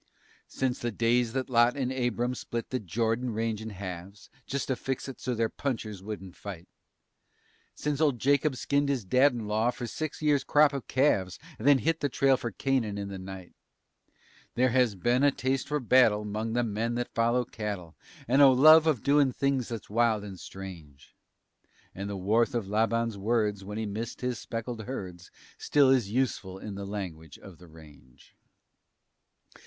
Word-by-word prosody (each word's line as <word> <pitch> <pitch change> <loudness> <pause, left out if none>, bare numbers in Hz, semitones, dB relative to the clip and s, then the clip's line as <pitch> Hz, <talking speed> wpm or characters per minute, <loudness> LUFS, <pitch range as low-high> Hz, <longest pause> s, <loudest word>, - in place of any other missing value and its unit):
Since 130 -2 -2
the 120 - -2
days 115 +1 +1
that 130 -1 -2
Lot 120 +1 +3
and 130 -2 -1
Abram 120 -1 -1
split 120 -1 -5
the 130 - -1
Jordan 115 +5 -1
range 110 -1 -2
in 110 - -6
halves, 95 0 -8 0.2
Just 140 +1 -3
to 130 - +1
fix 135 +1 -4
it 135 - -8
so 125 -1 -2
their 115 0 +1
punchers 110 -7 -4
wouldn't 95 -3 -7
fight, 90 -4 -8 1.1
Since 150 0 -2
old 145 -5 +3
Jacob 140 +3 +2
skinned 140 +2 0
his 130 -7 -1
dad 130 +8 +4
in 120 -3 -5
law 110 +3 +1
for 125 0 -4
six 155 +5 -5
years' 150 -2 +2
crop 150 -1 +4
of 140 -3 -5
calves 100 -9 +1 0.2
And 115 - -2
then 145 -1 +7
hit 165 +4 0
the 145 - 0
trail 135 +1 +3
for 120 - -4
Canaan 115 -3 -1
in 100 -1 -4
the 95 -1 -6
night, 95 -1 -9 1.0
There 125 0 +3
has 125 -4 +2
been 120 +7 +1
a 145 - +6
taste 130 -1 -1
for 150 +1 -1
battle 115 -4 +4
'mong 110 +2 -3
the 120 - +2
men 115 +1 -2
that 120 0 -3
follow 120 +2 +2
cattle 100 -8 -6 0.3
And 135 +4 +4
a 140 - +10
love 155 +5 +7
of 145 -9 +1
doin' 140 -1 +4
things 135 -1 -1
that's 115 -4 -6
wild 110 -1 +1
and 95 -3 -8
strange, 85 -8 -11 0.8
And 100 +2 -5
the 100 - -4
warmth 110 +6 +1
of 115 -5 -2
Laban's 115 +1 0
words 105 -2 0
when 105 +2 -6
he 110 - -2
missed 110 +3 -5
his 125 -1 -2
speckled 115 0 -5
herds 90 -8 -7 0.3
Still 140 -3 +4
is 125 -7 +2
useful 105 -6 -1
in 105 +1 -7
the 100 0 -6
language 85 -7 -6
of 95 -4 -14
the 90 - -14
range. 75 -6 -18
115 Hz, 180 wpm, -28 LUFS, 100-130 Hz, 1.1 s, a